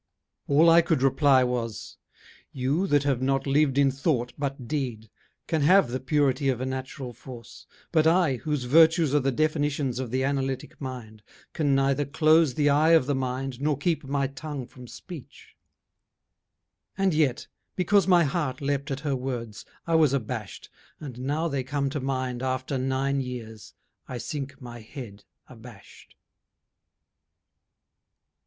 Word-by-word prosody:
All 150 +4 +5
I 165 +1 +7
could 160 -5 0
reply 135 -1 +4
Was: 120 -3 -4 0.5
'You, 140 +9 -1
that 145 -4 +3
have 135 -3 0
not 135 +1 0
lived 140 -1 +2
in 140 -1 +4
thought 130 -3 -1
but 135 -3 -4
deed, 120 -7 -4 0.3
Can 160 -2 -1
have 160 -3 +4
the 130 - -2
purity 135 0 +1
of 125 -3 0
a 130 - -2
natural 130 -1 -5
force, 120 -1 -12 0.2
But 160 0 +3
I, 165 -6 +3
whose 150 +1 -2
virtues 160 +3 +4
are 145 - +4
the 135 0 0
definitions 145 -2 0
Of 130 -2 -4
the 130 +2 -1
analytic 135 -1 -3
mind, 120 -5 -7 0.3
can 145 -4 +1
neither 135 +1 +2
close 155 -1 +3
The 145 -1 +2
eye 150 +3 +4
of 160 -6 +5
the 145 - 0
mind 130 0 -3
nor 150 -1 +1
keep 160 +2 -1
my 140 0 -1
tongue 140 0 -6
from 125 0 -13
speech.' 160 +1 -12 1.4
And 195 -2 +2
yet, 150 -5 +1 0.3
because 195 0 +2
my 175 -2 +5
heart 140 -3 -2
leaped 140 +1 -2
at 135 -1 -4
her 145 -3 -1
words, 120 -6 -5 0.2
I 165 - -2
was 155 -4 +4
abashed, 115 -5 -5 0.3
and 130 -5 -8
now 145 +6 -1
they 140 -4 -2
come 140 +1 -2
to 145 - -3
mind 130 -2 -3
After 130 +1 -2
nine 135 +1 0
years, 115 -4 -8 0.3
I 125 - -5
sink 135 +2 -6
my 120 -3 -9
head 110 -3 -10 0.2
abashed. 115 -4 -15
135 Hz, 155 wpm, -26 LUFS, 125-150 Hz, 1.4 s, I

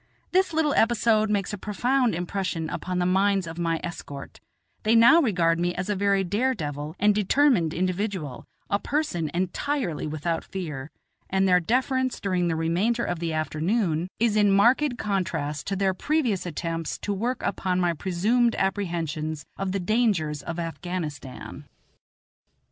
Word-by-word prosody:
This 375 0 +3
little 315 -2 +1
episode 225 -2 +3
makes 205 -1 0
a 205 - -4
profound 245 +2 +1
impression 175 -2 -3
upon 180 +2 -3
the 180 - +1
minds 195 +1 +2
of 165 +1 -7
my 165 -1 0
escort; 145 -5 -7 0.4
they 220 +2 +3
now 240 +9 +7
regard 170 - +2
me 175 0 0
as 185 - -3
a - - 0
very 200 0 +2
dare 230 +8 0
devil 150 - -5
and 210 +1 +4
determined 210 - +3
individual, 185 - -2 0.2
a 200 - +1
person 205 - -1
entirely 185 - -2
without 155 +2 -2
fear, 150 -7 -6 0.4
and 190 0 +2
their 180 -1 +5
deference 255 - 0
during 180 -3 0
the 165 - 0
remainder 180 +9 +1
of 175 - -2
the 165 -1 -2
afternoon 160 +2 0
is 225 -2 +2
in 205 -1 +4
marked 245 +6 +4
contrast 165 - -2
to 195 - -1
their 190 0 +1
previous 225 - 0
attempts 165 -1 -3
to 205 - -3
work 235 +6 -2
upon 185 -1 0
my 175 -1 +2
presumed 210 +8 +1
apprehensions 165 -6 -2
of 195 -1 -3
the 200 - -1
dangers 185 - +1
of 165 +4 -5
Afghanistan. 165 -5 -5
185 Hz, 155 wpm, -26 LUFS, 165-215 Hz, 0.4 s, now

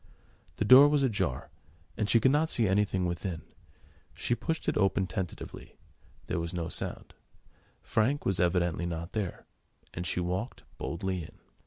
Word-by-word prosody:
The - - -1
door 130 +6 +10
was 145 -1 +2
ajar, 105 - -1 0.4
and 105 -2 -1
she 115 - +6
could 130 +4 +4
not 155 +3 +2
see 115 -4 +1
anything 95 -1 +1
within. 85 0 -3 0.7
She - - 0
pushed 160 +6 -3
it - - +1
open 95 -1 +2
tentatively: 90 -1 -6 0.5
there - - -2
was 85 +2 -3
no 85 -2 -2
sound: - - -5 0.7
Frank 130 +7 +1
was 95 -2 0
evidently 85 -1 +1
not 85 +1 -5
there, 100 -4 -4 0.5
and 85 +1 -4
she 90 - 0
walked 90 +7 -3 0.2
boldly 95 +2 -2
in. 80 - -11
95 Hz, 155 wpm, -30 LUFS, 85-115 Hz, 0.7 s, door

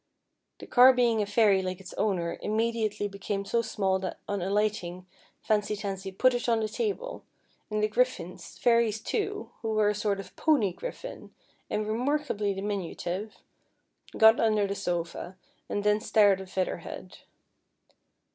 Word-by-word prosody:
The - - -10
car 255 +1 +7
being 240 -3 +2
a 205 - -1
fairy 205 -2 +4
like 185 0 -4
its 190 -1 -10
owner, 175 -5 -1
immediately 215 -1 0
became 200 0 -4
so 235 +3 +1
small 195 -4 0
that 185 -1 -4
on 200 -2 -2
alighting, 190 -2 -1 0.4
Fancy 210 -1 +1
Tansy 195 -2 -5
put 255 +7 +3
it 245 0 -1
on 230 -1 +3
the 220 - 0
table; 465 - -3 0.5
and 210 0 -1
the - - +4
griffins, 215 -7 -2
fairies 230 -3 +3
too, 415 - -3
who 225 -1 -2
were 210 -1 +4
a - - +1
sort 205 -1 -1
of 195 -1 -10
pony 255 - +2
griffin, - - -8 0.3
and 215 - -1
remarkably 245 -2 0
diminutive, 195 0 -4 0.7
got 220 +1 +7
under 215 -2 +3
the 200 - -2
sofa, 175 -1 -4 0.3
and 205 - -2
thence 210 0 +1
stared 205 -3 +5
at 190 - -10
Feather 185 0 -1
Head. 180 +2 -9
210 Hz, 155 wpm, -28 LUFS, 195-230 Hz, 0.7 s, car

